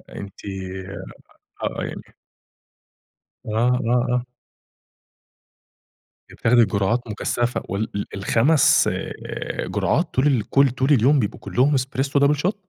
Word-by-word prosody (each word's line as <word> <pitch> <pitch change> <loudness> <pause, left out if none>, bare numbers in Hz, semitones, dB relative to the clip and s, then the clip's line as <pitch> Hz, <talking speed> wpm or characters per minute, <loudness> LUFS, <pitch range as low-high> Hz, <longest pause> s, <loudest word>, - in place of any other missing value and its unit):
أنتِ 100 -1 -9 1.2
آه، - - -2
يعني - - -6 1.4
آه، - - -5
آه، 125 +1 +2
آه. 125 0 0 2.0
بتاخدي 120 0 +3
جرعات 105 +5 -1
مكثفة 120 +3 -2
وال 100 +3 -2
ال 100 - -2
ال5 120 +9 +3
آآ، - - -5
جرعات - - 0
طول 130 +3 +2
ال 120 -5 0
كل 140 0 +4
طول 130 +3 -1
اليوم 135 +3 +4
بيبقوا 105 -5 -2
كلّهم 135 +4 +1
إسبريسو 135 +2 0
double 140 +1 +3
shot؟ - - -24
125 Hz, 115 wpm, -22 LUFS, 115-135 Hz, 2.0 s, كل